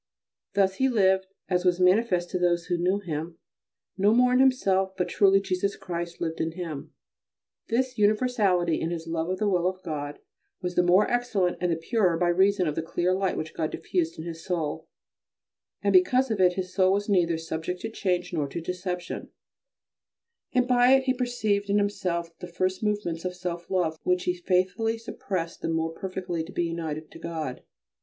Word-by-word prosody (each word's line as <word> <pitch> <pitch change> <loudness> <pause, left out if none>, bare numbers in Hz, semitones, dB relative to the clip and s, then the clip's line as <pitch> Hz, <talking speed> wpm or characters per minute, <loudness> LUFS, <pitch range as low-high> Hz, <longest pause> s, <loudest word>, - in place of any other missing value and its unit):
Thus 195 -1 +2
he 265 0 +3
lived, 190 -5 +3 0.2
as 180 -1 +1
was 180 -1 +2
manifest 180 -1 +3
to 180 - -1
those 175 -1 +1
who 175 -1 0
knew 185 +3 +2
him, 165 -3 -5 0.6
no 205 +3 +4
more 250 +1 +4
in 250 - +4
himself 195 -8 +2
but 180 -2 0
truly 195 +1 +5
Jesus 195 0 -1
Christ 170 -1 -5
lived 165 -1 -2
in 160 0 -1
him. 165 -5 -6 0.8
This 250 +1 -1
universality 205 -6 +2
in 165 - -1
his 165 -1 -4
love 165 0 -2
of 185 - -1
the 210 - 0
will 180 -3 +2
of 185 0 -4
God 145 -3 -4 0.4
was 180 -1 -3
the 180 - +4
more 180 +3 +4
excellent 220 -7 0
and 180 -1 +1
the - - +2
purer 180 0 +1
by 175 0 +2
reason 190 +2 +3
of 150 - 0
the 165 - -2
clear 175 +3 0
light 190 0 0
which 155 - -4
God 155 -1 -1
diffused 165 -3 -2
in 160 - -6
his 165 -1 -7
soul, 160 -2 -3 1.0
and - - +2
because 265 -9 +4
of 205 -3 0
it 180 -1 +5
his 185 0 -4
soul 185 0 +4
was 205 +1 -1
neither 175 -5 +2
subject 165 +2 -4
to 225 - -4
change 180 -4 -1
nor 150 -4 0
to 140 +5 -5
deception, 180 +1 -4 1.2
and 250 -1 +2
by 250 0 +5
it 265 0 +5
he 260 0 +2
perceived 220 -5 -1
in 200 - +3
himself 180 -5 -1
the 180 - -7
first 185 +2 -1
movements 205 -6 -1
of 180 -1 -3
self 175 -1 -5
love 170 -4 0
which 180 0 +1
he 180 - +1
faithfully 185 +5 0
suppressed 185 -6 -5
the - - -2
more 160 0 0
perfectly 180 -1 -4
to - - -10
be 175 - -1
united 160 -2 -4
to - - -11
God. 160 -6 -5
180 Hz, 195 wpm, -27 LUFS, 170-200 Hz, 1.2 s, truly